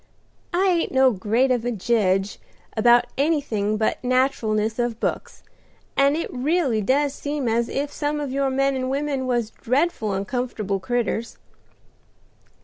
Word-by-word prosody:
"I 360 +3 +2
ain't 345 -3 +1
no 265 -1 +5
great 225 +6 +1
of 245 -3 +1
a 245 - -1
jedge 200 -3 0 0.4
about 240 +2 +5
anything 255 -9 0
but 220 +3 -1
nat'ralness 230 -4 +1
of 235 -2 -3
books, - - -3 0.5
and 280 +2 +3
it 335 - -4
really 270 -3 +1
does 275 +6 +1
seem 285 -2 -3
as 230 +1 +1
if 285 +1 -2
some 295 0 -2
of 285 -3 -3
your 275 0 0
men 275 +1 +1
and 255 0 -2
women 275 -1 -1
was 240 -3 0
dreadful 255 - 0
uncomfortable 205 -1 -2
creaters. 235 +2 -2
255 Hz, 140 wpm, -23 LUFS, 220-280 Hz, 0.5 s, no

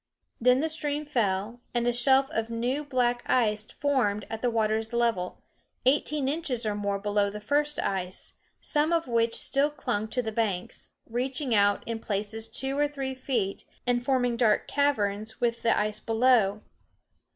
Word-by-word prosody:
Then 250 +2 +4
the 320 - +1
stream 300 -1 -1
fell, 230 -3 -1
and 240 0 +1
a 240 - +2
shelf 265 +3 +4
of 225 0 -2
new 245 +5 -1
black 245 -4 +1
ice 215 -4 +2
formed 240 -9 0
at 225 0 -4
the 245 - +2
water's 220 0 0
level, 230 -7 0 0.4
eighteen 285 +1 +2
inches 275 -6 -1
or 210 - 0
more 200 -1 -1
below 205 0 +1
the 210 +1 -7
first 290 +7 0
ice, 185 -1 -3 0.3
some 305 +2 +1
of 330 -3 +1
which 230 -1 +1
still 280 +2 +2
clung 220 -8 -2
to 230 +3 -2
the 220 - -3
banks, 210 -5 -2 0.2
reaching 255 +2 -2
out 205 -1 +3
in 230 -1 -3
places 215 +1 -3
two 270 0 0
or 295 - +3
three 275 -2 -4
feet 250 -7 -2 0.2
and 245 -1 +1
forming 245 -2 +1
dark 225 -3 +2
caverns 220 -6 0
with 235 -1 0
the 230 - +2
ice 210 0 0
below. 225 -3 +2
235 Hz, 165 wpm, -27 LUFS, 215-265 Hz, 0.4 s, Then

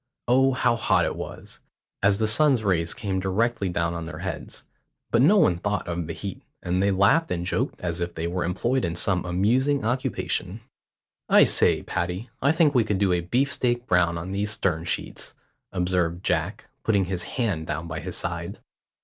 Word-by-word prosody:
Oh, 135 +2 +4
how 125 -2 +2
hot 115 - +2
it - - -2
was, - - -8 0.4
as 100 0 +3
the 110 0 +1
sun's 130 +1 +3
rays 85 -5 0
came 95 -3 -2
directly 100 +2 0
down 85 -1 -1
on 85 -1 -5
their 80 - -7
heads; 95 +2 -6 0.5
but 115 - +4
no 170 +10 +6
one 90 - +3
thought 105 0 -2
of 85 -1 -3
the 85 - -4
heat, 100 +1 -6 0.2
and 90 +1 0
they 100 - +3
laughed 100 - +3
and 85 0 -2
joked 95 - -1
as 85 -1 -3
if 85 0 -3
they 80 - -3
were 90 +2 -2
employed 120 +9 0
in 85 -1 -1
some 90 +1 +1
amusing 120 +11 +1
occupation. 115 -4 -1 0.7
"I - - +7
say, - - +3
Paddy, 90 +7 -3
I 140 - +4
think 160 -3 +3
we 125 -4 +4
could 105 -2 -1
do 95 -2 +2
a 90 - +1
beefsteak 125 +4 0
brown 85 -3 +2
on 85 +3 -5
these 100 +1 -1
stern 85 -6 -1
sheets," - - -4 0.4
observed 90 -1 0
Jack, - - -1
putting 100 -4 +2
his 90 -1 -3 0.2
hand 100 -11 -1
down 80 +2 -3
by 85 -1 -4
his - - -5
side. - - -4
95 Hz, 190 wpm, -25 LUFS, 85-120 Hz, 0.7 s, I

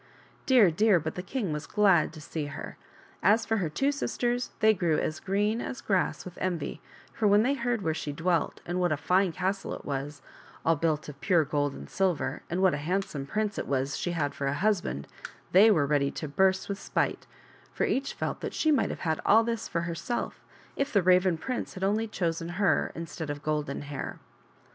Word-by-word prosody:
Dear, 245 -10 +6
dear, 205 +2 +4
but 160 0 -4
the 180 - -4
king 195 - -3
was 150 0 -5
glad 195 -7 +4
to 155 - -10
see 150 -1 -4
her; 145 - -7 0.5
as 220 +3 +4
for 225 - +1
her 175 -6 -1
two 270 - +1
sisters, 245 -3 -1
they 220 0 +5
grew 175 -6 +1
as 155 - -2
green 205 +4 0
as 255 - -5
grass 190 -3 0
with 180 -1 -9
envy, 175 -5 -2 0.3
for 215 - +1
when 205 +1 +5
they 265 +4 +2
heard 240 -5 -1
where 160 - +1
she 155 -2 -4
dwelt, 165 +2 0
and 175 +1 -2
what 175 -2 +2
a 155 - +1
fine 180 +5 +2
castle 190 +3 -2
it - - -11
was, 140 0 -4 0.4
all 165 - +4
built 155 0 0
of 140 -2 -10
pure 175 -6 +3
gold 145 -1 -1
and - - -9
silver, 170 -7 -1
and 180 +3 0
what 190 - +5
a - - -1
hand 180 +7 0
some 140 -7 -6
prince 210 +4 -1
it - - -4
was 135 0 0
that - - -3
she 175 - -2
had 145 -4 -1
for 140 - -3
a 140 - 0
husband, 175 - 0 0.5
they 200 +5 +7
were 155 -9 +4
ready 140 -1 +2
to 155 - -5
burst 190 +6 +2
with 200 0 -4
spite, - - -1 0.4
for - - -2
each 275 +1 0
felt - - -3
that - - -4
she 315 - +2
might 290 - +2
have - - -6
had 160 -2 -1
all 225 +2 +6
this 230 -1 -2
for 170 - -1
herself 170 +9 -3 0.3
if 275 - -1
the 200 -3 +3
Raven 180 -1 +4
prince 250 +8 -4
had 185 - -5
only 215 +3 +1
chosen 170 -5 -2
her 200 -5 +2
instead 165 -1 -6
of 145 0 -5
Golden 150 -2 -2
Hair. 145 -1 -5
180 Hz, 215 wpm, -28 LUFS, 150-210 Hz, 0.5 s, they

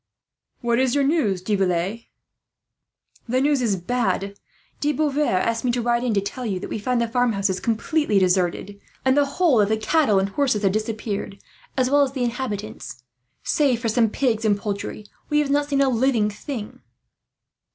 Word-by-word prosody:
"What 235 0 +1
is 260 -1 +2
your 285 - +3
news, 270 - +1
De 210 - -1
Villette?" 195 +3 0 1.2
"The 255 +2 +2
news 285 0 +2
is 220 -5 +1
bad. 200 0 -1 0.4
De 295 +1 +1
Beauvoir 295 -7 +1
asked 230 +3 -1
me 250 - +1
to 245 - 0
ride 240 0 +1
in 240 -4 0
to 200 - +2
tell 250 +6 -5
you 200 -6 -2
that - - -7
we - - -2
find 250 +3 0
the 235 - +1
farmhouses 210 -6 0
completely 230 - 0
deserted, 185 +2 +1 0.3
and 260 0 +4
the 285 -1 +3
whole 315 -11 +4
of 205 - +1
the 220 - +2
cattle 220 -1 +2
and 195 +1 +1
horses 230 -2 0
have 195 - +3
disappeared, 215 -1 -3 0.4
as 255 0 +1
well 290 0 +5
as 275 -2 +1
the 260 -3 -2
inhabitants. 215 - -5 0.4
Save 275 -6 +2
for 235 -2 -1
some 225 0 +2
pigs 230 -2 0
and 210 -2 +2
poultry, 205 +1 -5 0.2
we 295 - +2
have 295 -2 +1
not 290 0 +2
seen 275 -1 +2
a 275 - +3
living 235 -3 +2
thing." 220 0 -7
230 Hz, 185 wpm, -23 LUFS, 205-265 Hz, 1.2 s, well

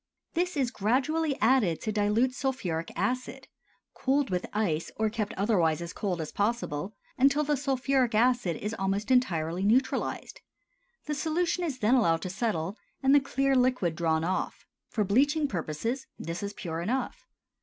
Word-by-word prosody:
This 355 -1 -1
is 255 -4 +1
gradually 275 +8 0
added 220 -8 +3
to 220 - -2
dilute 215 +5 +2
sulphuric 185 - -2
acid, 255 0 -2 0.5
cooled 275 -1 0
with 180 0 -1
ice 175 -7 -1
or 220 -1 0
kept 215 -1 -2
otherwise 180 -6 +2
as 170 -1 -6
cold 185 -4 -2
as 155 - -5
possible, 205 -4 -2 0.2
until 275 +3 +4
the 295 0 +1
sulphuric 265 -3 +1
acid 240 -6 +3
is 210 +2 -4
almost 200 +2 -1
entirely 175 -9 +1
neutralized. 245 +6 0 0.6
The 300 - -2
solution 335 +4 0
is 300 -7 -2
then 225 0 +2
allowed 165 -11 +3
to 185 - -3
settle 195 -2 -2 0.2
and 265 +1 +5
the 290 - +8
clear 275 0 +1
liquid 250 -10 +2
drawn 160 -1 +1
off. 185 +3 -2 0.2
For 215 - 0
bleaching 285 +9 +2
purposes, 220 - -3
this 165 +1 -5
is 200 0 -4
pure 165 -4 -4
enough. 245 +9 -3
225 Hz, 155 wpm, -28 LUFS, 185-265 Hz, 0.6 s, the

